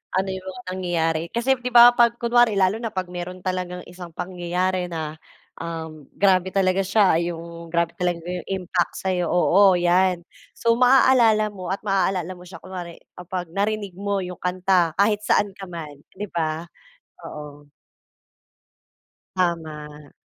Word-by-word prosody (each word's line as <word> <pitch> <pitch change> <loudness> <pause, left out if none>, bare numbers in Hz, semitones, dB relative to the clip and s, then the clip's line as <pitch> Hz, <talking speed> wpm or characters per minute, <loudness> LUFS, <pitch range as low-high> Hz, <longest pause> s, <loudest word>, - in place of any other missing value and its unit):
ano 190 +1 +1
'yong 190 0 -6
mga 185 0 -8
nangyayari. 165 -3 0
Kasi 240 +3 +1
'di 250 0 -3
ba, 240 0 +8
'pag 235 -1 +3
kunwari 235 -3 +3
lalo 195 +4 +2
na 230 - -2
'pag 185 -3 -4
mayro'n 180 +1 -7
talagang 180 -1 -3
isang 180 -1 -10
pangyayari 180 0 -2
na, 160 -3 -4 0.5
um, 160 -3 -7
grabe 190 -2 +3
talaga 190 0 +2
siya, 195 -3 +3
'yong 170 0 -6
grabe 170 0 0
talaga 175 -2 -2
'yong 180 0 -5
impact 185 -2 -1
sa'yo, 180 -3 -1
oo 185 +1 +5
'yan. 175 0 +2 0.3
So 230 0 +3
maaalala 240 -4 +4
mo 185 -3 -7
at 195 +3 -4
maaalala 190 -2 0
mo 180 - -15
siya 180 - -10
kunwari 180 -2 -7 0.2
kapag 180 0 -5
narinig 205 -1 -1
mo 200 +2 -2
'yong 180 -1 -7
kanta 180 -2 +1
kahit 205 +1 +2
saan 205 -1 +1
ka 195 -1 -10
man, 155 -5 -8 0.2
'di 205 - -3
ba? 160 -1 -2 0.6
Oo. 145 -1 -10 1.7
Tama. 155 -5 -3
185 Hz, 150 wpm, -23 LUFS, 170-195 Hz, 1.7 s, ba